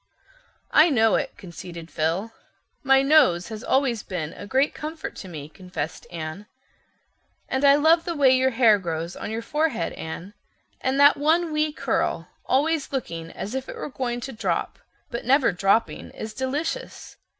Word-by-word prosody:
"I 315 +3 +6
know 225 -6 +3
it," - - -1
conceded 170 -2 -9
Phil. 165 +8 -1 0.5
"My 270 0 +4
nose 230 - +4
always 265 -4 +1
has - - -9
been 165 -5 -4
a 205 - -9
great 265 +6 +2
comfort 315 +1 -6
to 190 - -8
me," 155 -5 -7
confessed 165 -2 -6
Anne. 170 +4 -6 1.0
"And 265 +1 -1
I 280 0 +7
love 320 +3 +4
the 340 - -3
way 275 -3 +5
your 260 0 +3
hair 230 -4 +4
grows 170 -1 -4
on - - -6
your 225 +1 -4
forehead, 300 -5 -1
Anne. 170 +5 -7 0.5
And 265 +1 0
that 285 +1 +7
one 320 +3 +2
wee 305 0 +1
curl, - - -1 0.2
always 295 +3 +1
looking 170 -12 -4
as 210 - -6
if 265 0 -4
it - - -6
were - - -5
going 245 -3 -3
to 265 - -5
drop, 225 - -2 0.3
but 235 - -4
never 270 +2 +4
dropping, 195 +5 +1
is 220 0 -7
delicious. 290 - -4
245 Hz, 165 wpm, -24 LUFS, 180-285 Hz, 1.0 s, I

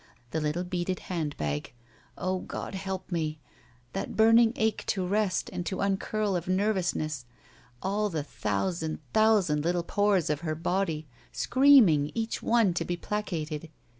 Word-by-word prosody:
The 160 - -1
little 150 +4 -1
beaded 180 0 -2 0.2
hand 155 -4 -2
bag. 75 +6 -3 0.4
O 185 0 -1
God! - - -6
help 190 0 -5
me! 155 -3 -1 0.6
That - - -4
burning 225 +1 +6
ache 220 -1 0
to 190 -3 0
rest 200 0 0
and 175 - -3
to 190 - -3
uncurl 200 +1 0
of 175 -1 -3
nervotisness. 185 - 0 0.6
All 205 +2 0
the 160 -5 -2
thousand 155 - -2 0.2
thousand 205 -9 +3
little 175 +1 +1
pores 195 -4 +2
of 150 - -1
her 155 -2 -2
body, 165 -1 -1 0.3
screaming 245 - +5
each 225 0 -2
one 225 -6 +3
to 170 - -1
be 175 +1 -3
placated. 165 -6 -3
180 Hz, 145 wpm, -28 LUFS, 155-205 Hz, 0.6 s, burning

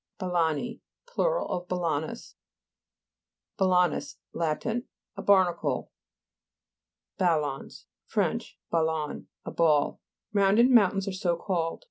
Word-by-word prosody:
BALA'NI 180 - -1 0.2
Plur. - - 0
of 175 0 -4
balanus. 170 +3 -2 1.3
BALA'NUS 180 -6 +2 0.2
Lat. 160 -2 -1
A 235 +2 -5
barnacle, 185 -4 +2 1.3
(p. 185 - +2
85.) 165 -3 +4
BALLOTS 135 -2 -6 0.2
Fr. - - +1 0.5
ballon, 160 -2 -1 0.2
a - - -4
ball. 155 -3 +2 0.3
Round 200 0 +4
ed 245 +3 +6
mountains 200 -4 +4
are - - -1
so 180 -2 0
called. 170 -2 -2
180 Hz, 105 wpm, -28 LUFS, 160-200 Hz, 1.3 s, ed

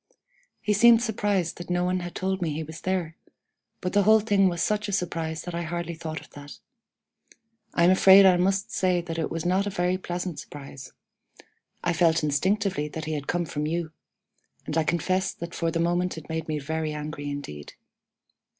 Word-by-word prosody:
He 210 - +1
seemed 230 +2 +6
surprised 205 -6 -1
that 175 - -8
no 180 0 +1
one 185 0 0
had 175 -1 -7
told 190 0 -2
me 165 -3 0
he 155 +2 -3
was 160 +1 -9
there, 180 -4 -2 0.6
but 180 - -3
the 205 - +4
whole 215 +2 +6
thing 200 -3 +3
was 175 -1 -4
such 210 0 0
a - - -2
surprise 165 -4 -2
that 175 - -6
I 170 - -2
hardly 170 0 -4
thought 160 -1 -5
of - - -17
that. 145 0 -11 1.2
I 170 - +3
am 175 - +6
afraid 190 +1 +8
I 185 -1 +7
must 195 +4 0
say 185 -5 +1
that 165 -1 -5
it 160 - -1
was 165 0 -4
not 190 +3 +2
a - - 0
very 180 -1 0
pleasant 175 -2 -4
surprise. 140 -2 -10 0.9
I 175 - +1
felt 165 -1 +3
instinctively 185 +3 0
that 155 +1 -6
he 155 - -3
had 145 -2 -4
come 175 0 0
from 150 -1 -3
you, 165 0 -2 0.7
and 155 - -4
I 160 - +3
confess 185 +4 0
that 170 0 -7
for 165 - -1
the 165 - -2
moment 175 +1 0
it 160 - -10
made 160 0 -3
me 155 -1 -1
very 155 +2 -3
angry 150 -1 -5
indeed. 105 - -7
175 Hz, 200 wpm, -26 LUFS, 160-185 Hz, 1.2 s, afraid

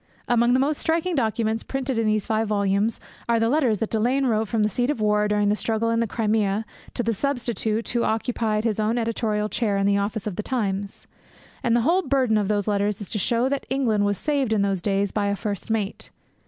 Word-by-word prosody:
Among 240 0 +3
the 255 - +4
most 285 +2 +1
striking 335 +2 0
documents 225 -4 0
printed 265 -3 -2
in 225 - +1
these 215 -1 +1
five 220 0 0
volumes 200 +1 +1 0.3
are 230 -1 +3
the 225 0 +2
letters 255 -6 +2
that 225 - -3
Delane 245 +5 +1
wrote 220 -3 +1
from 220 +1 0
the - - +3
seat 245 +4 -1
of 295 - -1
war 210 0 +2
during 210 -1 +2
the 210 - +3
struggle 225 +1 0
in 230 - +1
the 230 - +1
Crimea 215 -1 0 0.3
to 245 - -1
the 230 0 +1
substitute 230 -3 -1
who 235 -1 0
occupied 220 -1 0
his 220 -2 0
own 215 +2 +1
editorial 225 -2 -1
chair 210 -2 0
in 195 - +1
the 200 0 +3
office 205 +1 -2
of 205 -4 -4
The - - 0 0.2
Times. 200 -2 -3 0.6
And 235 -3 +2
the 240 - +3
whole 340 +10 +3
burden 260 - +2
of 205 - 0
those 205 -1 0
letters 205 -1 0
is 205 - -8
to 210 - -1
show 235 +6 +1
that 280 0 -2
England 240 -6 +1
was 205 -1 +1
saved 280 -4 0
in 205 -2 +2
those 195 -2 0
days 200 0 0
by 205 -1 0
a 200 - 0
first 200 0 -4
mate. 215 -3 -2
220 Hz, 230 wpm, -24 LUFS, 210-240 Hz, 0.6 s, the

